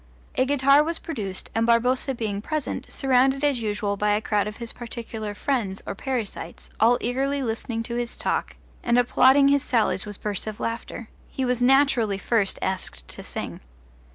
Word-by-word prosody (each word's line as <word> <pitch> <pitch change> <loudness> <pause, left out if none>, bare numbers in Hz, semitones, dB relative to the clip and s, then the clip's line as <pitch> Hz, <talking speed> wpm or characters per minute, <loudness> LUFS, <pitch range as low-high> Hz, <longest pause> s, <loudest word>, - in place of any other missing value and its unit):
A 260 - +2
guitar 275 +1 +5
was 330 +1 0
produced, 205 - -5
and 225 +1 +1
Barboza 250 +3 +2
being 210 -4 -3
present, 305 +5 -3
surrounded 270 +1 +2
as 280 -5 +2
usual 205 -1 -1
by 210 +1 +2
a 210 - +2
crowd 210 -1 0
of 210 - -6
his 235 -2 -5
particular 225 -3 -6
friends 215 -7 -2
or - - -3
parasites, 240 -1 -5
all 235 +3 +5
eagerly 270 +3 0
listening 230 0 -3
to 235 - -5
his 240 0 -3
talk - - -1 0.3
and 240 0 +2
applauding 265 +3 +5
his 280 0 +4
sallies 215 -6 +1
with 205 -1 -8
bursts 210 0 -3
of 215 -1 -5
laughter, 230 0 -4 0.2
he 265 - -2
was 250 -1 0
naturally 250 -5 +4
first 205 -1 0
asked 185 - -3
to - - -8
sing. - - -6
235 Hz, 175 wpm, -25 LUFS, 210-265 Hz, 0.3 s, guitar